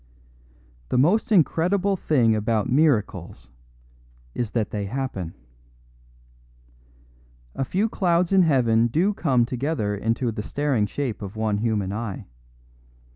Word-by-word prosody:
The - - 0
most 185 - +2
incredible 190 +2 +2
thing 125 -11 +2
about 110 0 0
miracles 105 - 0 0.8
is 120 -3 -2
that 110 -3 -1
they 100 -2 -3
happen. 100 -8 -4 2.2
A - - -2
few 195 - 0
clouds 175 -4 +1
in 195 -1 +5
heaven 120 -8 +3
do 170 - +1
come 130 -11 +1
together 125 -4 -2
into 115 +4 -1
the 105 - -5
staring 130 -3 -1
shape 120 0 -4
of 100 +1 -7
one 110 -2 -1
human 105 -4 -1
eye. 105 -3 -5
120 Hz, 120 wpm, -24 LUFS, 105-160 Hz, 2.2 s, in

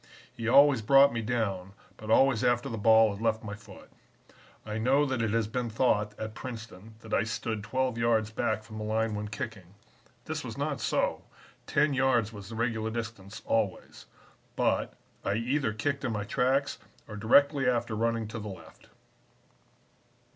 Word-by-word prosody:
He 115 -1 -5
always 140 0 +6
brought 135 +5 +6
me 115 - -2
down, 100 -5 -2 0.2
but 110 - -10
always 130 0 +4
after 120 -1 +2
the 115 - -4
ball 110 0 +5
had 100 - -9
left 110 -1 0
my 105 -2 -6
foot. 110 - -13 0.7
I 110 0 -4
know 135 +6 +3
that 130 -4 -1
it 115 - 0
has 115 +1 +1
been 120 +2 -3
thought 105 -2 +1
at 110 0 -5
Princeton 110 -4 -9
that 110 - -9
I - - +3
stood 110 0 -3
twelve 130 +2 -1
yards 110 -2 +1
back 110 0 -1
from 110 -1 -9
the - - -4
line 110 +1 0
when 105 0 -4
kicking. 105 -5 -7 0.5
This - - -4
was - - -7
not - - -2
so. - - 0 0.4
Ten 145 0 +2
yards 125 -4 +2
was 100 -1 -9
the 115 - -7
regular 110 -1 -1
distance, 110 -3 -6
always. 110 -5 -2 0.5
But, - - 0 0.3
I 100 - 0
either 125 +2 0
kicked 140 +6 -2
in 125 -4 -1
my 105 -1 -2
tracks 130 +5 0 0.3
or 105 - -8
directly 135 +5 +4
after 120 -2 -1
running 115 0 0
to 115 - -6
the 105 -1 -6
left." 95 - -13
115 Hz, 175 wpm, -29 LUFS, 110-125 Hz, 0.7 s, always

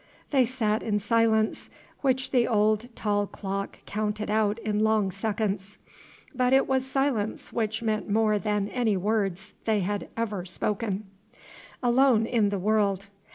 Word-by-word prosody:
They 265 -4 +4
sat 225 -3 0
in 210 -2 0
silence, 220 0 +1 0.3
which 260 -2 0
the 245 -3 +3
old 215 +1 +2
tall 205 -1 0
clock 195 0 -5
counted 210 0 -2
out 215 -1 +2
in 215 -2 -2
long 215 -3 +2
seconds; 200 0 -2 0.6
but 250 0 +2
it 270 - +5
was 265 0 0
silence 265 -6 -1
which 220 0 -1
meant 215 -1 -1
more 215 0 +2
than 210 -1 0
any 225 -5 +1
words 195 -1 -1
they 215 -2 +2
had 205 +2 -3
ever 210 -5 -2
spoken. 205 +2 -2 0.8
"Alone 245 -2 +4
in 225 -3 +2
the 200 - -1
world. 200 -1 +1
215 Hz, 145 wpm, -27 LUFS, 205-230 Hz, 0.8 s, it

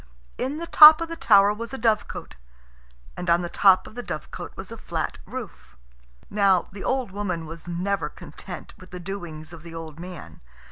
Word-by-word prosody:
In 270 +4 -2
the 335 - -4
top 310 -1 +10
of 335 0 -4
the 330 - -4
tower 205 -8 +5
was 230 +4 -6
a - - -6
dovecot, 220 -3 -1 0.8
and 180 - -4
on 170 +1 +3
the 175 - -4
top 190 +1 +5
of - - -12
the 245 - -5
dovecot 155 -10 -7
was - - -8
a - - -7
flat - - -4
roof. - - -9 0.5
Now, 195 -3 +2
the 195 +1 -8
old 260 -6 -1
woman 185 -5 -3
was 165 +1 -10
never 185 +3 -2
content - - -10
with 185 - -14
the 180 - -8
doings 175 -4 -7
of 165 - -10
the 165 0 -11
old 160 -1 -8
man. 170 - -10
185 Hz, 190 wpm, -24 LUFS, 170-215 Hz, 0.8 s, top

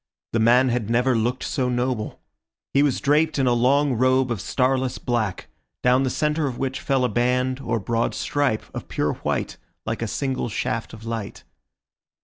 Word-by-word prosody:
The 115 - +2
man 125 +3 +5
had 120 -3 -1
never 125 +2 +2
looked 120 +3 0
so 130 -2 -1
noble. 125 -3 -2 0.5
He 140 - +4
was 145 -3 +2
draped 150 +3 +2
in 135 - +2
a 125 - +3
long 135 +4 +3
robe 130 +1 +2
of 110 -6 -2
starless 130 +1 0
black, 115 -6 -2 0.4
down 125 +1 +4
the 135 - +1
centre 150 +2 0
of 125 -3 -4
which 130 0 -2
fell 135 -2 +1
a - - +3
band 125 +2 +1
or 115 - -1
broad 115 +3 -1
stripe 140 -7 0
of - - -6
pure - - -1
white, - - -3 0.3
like 110 +1 -3
a 115 - -1
single 130 +1 -2
shaft 115 +1 -3
of 110 0 -10
light. 115 -3 -5
125 Hz, 180 wpm, -23 LUFS, 115-135 Hz, 0.5 s, man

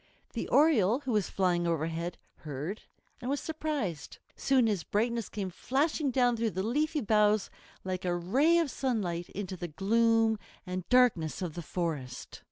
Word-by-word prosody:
The - - -3
Oriole, 265 - +4
who 265 - -3
was 210 -4 +1
flying 175 -2 +1
overhead, 165 +1 -2 0.2
heard 150 +7 -5 0.4
and 245 - -4
was 285 +1 0
surprised. 290 - -3 0.2
Soon 265 -3 +3
his 205 -6 0
brightness 230 +1 -1
came 195 -3 -4
flashing 285 - 0
down 245 -1 +3
through 230 0 0
the 190 -2 -3
leafy 300 +7 0
boughs 210 -2 +3 0.3
like 185 0 -3
a 175 -1 0
ray 265 - +3
of 330 -5 +1
sunlight 190 -10 -2
into 195 -1 -5
the 175 -1 -5
gloom 225 +6 +2 0.3
and 180 -1 -5
darkness 210 -10 +3
of 170 -4 -3
the 175 - -5
forest. 150 -7 -4
210 Hz, 160 wpm, -30 LUFS, 175-250 Hz, 0.4 s, Oriole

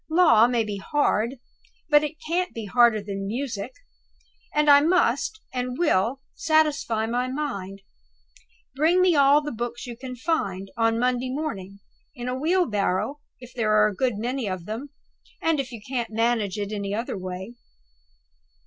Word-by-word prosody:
Law 315 -10 +6
may 240 -2 +1
be 210 -2 -4
hard, 235 0 0 0.5
but 295 -1 +5
it 300 +1 -3
can't 360 +2 -1
be 225 -2 -5
harder 230 0 +4
than 195 -1 -5
music; 230 -1 -4 0.8
and 300 0 +1
I 285 -1 +8
must, 360 +6 +1
and 250 0 -3
will, 265 - +1
satisfy 305 -8 +1
my 245 +2 -1
mind. 200 -9 -4 0.9
Bring 320 +6 +3
me 365 -2 +4
all 285 +1 +5
the 295 - -4
books 240 +2 -5
you 240 -2 -7
can 255 +1 -7
find, 200 - -2
on 225 0 +2
Monday 250 +1 0
morning 200 -9 -5 0.3
in 245 -2 -6
a 250 - -1
wheelbarrow, 270 - 0 0.2
if 250 0 -13
there 220 -3 +1
are 215 0 +5
a 205 - -7
good 245 -1 0
many 240 0 -2
of 185 -2 -5
them, 230 +8 -5 0.5
and 325 -2 +1
if 265 -1 -3
you 235 - -7
can't 245 -3 -2
manage 220 -2 0
it 205 0 -3
in 210 - -3
any 200 0 -3
other 230 +1 -3
way." 185 +3 -6
245 Hz, 165 wpm, -25 LUFS, 215-290 Hz, 0.9 s, I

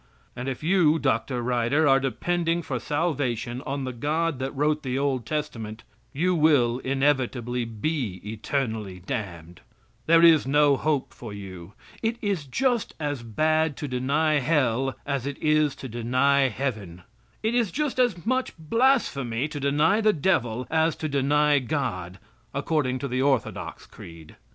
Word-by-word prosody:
And 125 +2 -4
if 135 +2 -6
you, 165 -2 +4
Dr. 125 -3 0
Ryder, 125 +5 +2
are 135 -1 +5
depending 170 +5 -1
for 130 -4 -3
salvation 130 -6 -2
on 140 0 -2
the 130 -1 -4
God 150 +4 -1
that 135 +1 -2
wrote 150 +2 +1
the 130 -2 -2
Old 135 -3 -1
Testament, 115 -8 -4 0.3
you 180 +6 +1
will 145 -7 +3
inevitably 130 -3 0
be 115 - -3
eternally 110 -3 -3
damned. 90 -9 -5 0.5
There 165 +1 +6
is 160 -5 +6
no 145 0 +4
hope 145 -1 -1
for 115 -4 -9
you. 95 -2 -9 0.3
It 230 +1 -1
is 195 -8 -2
just 240 - 0
as 145 -4 -2
bad 155 +6 +1
to 145 - -4
deny 145 +4 +1
Hell 135 -3 +1
as 140 -2 -2
it 140 - -4
is 155 -2 +2
to 130 - -8
deny 130 +4 +2
Heaven. 105 -9 -4 0.4
It 220 +2 +1
is 240 -4 +2
just 290 - -2
as 220 -9 +1
much 255 -2 -1
blasphemy 155 - +1
to 145 - -5
deny 150 +9 +2
the 215 -1 +4
devil 125 -7 0
as 160 0 +2
to 155 - -4
deny 145 +1 +3
God, 115 - -3 0.4
according 140 -6 0
to 140 - -4
the 130 0 -1
orthodox 135 -4 -1
creed. 80 -2 -13
140 Hz, 150 wpm, -25 LUFS, 120-155 Hz, 0.5 s, There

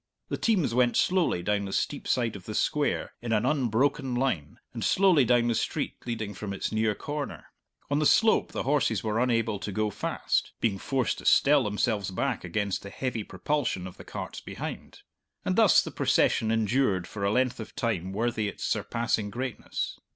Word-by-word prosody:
The - - -2
teams 190 - +1
went 125 0 +3
slowly 180 - +2
down 105 +1 0
the 95 - -5
steep 140 +7 -2
side 120 -4 +1
of 95 -2 -10
the 110 - -5
Square 150 +5 0
in 120 -1 -4
an 105 -1 +2
unbroken 135 -1 +1
line, 105 - -1 0.2
and 115 -3 -4
slowly 170 - +4
down 120 0 +3
the 120 - +2
street - - -1
leading 110 -3 -3
from 100 +1 -5
its 100 - -3
near 110 -1 +1
corner. 145 +3 -5 0.4
On 145 - +2
the 155 - +4
slope 220 0 +4
the - - -3
horses 130 -7 +1
were 110 0 0
unable 115 -4 +1
to 105 - -5
go 105 +2 0
fast - - -1
being 100 -4 0
forced 130 +3 -1
to - - -11
stell 140 -2 +5
themselves 105 -1 0
back 120 +6 -2
against 100 +3 -2
the 100 - -8
heavy 120 0 -3
propulsion 100 0 -2
of 95 - -9
the - - -10
carts - - -6
behind; - - -7 0.4
and - - +1
thus - - +6
the - - -6
procession 110 - +2
endured 110 -4 +1
for 100 +2 -6
a 100 - +2
length 125 +1 +1
of 110 - -8
time 95 -6 -1
worthy 110 +1 -1
its - - -6
surpassing 115 -3 -1
greatness. 125 +2 -4
115 Hz, 190 wpm, -28 LUFS, 105-130 Hz, 0.4 s, thus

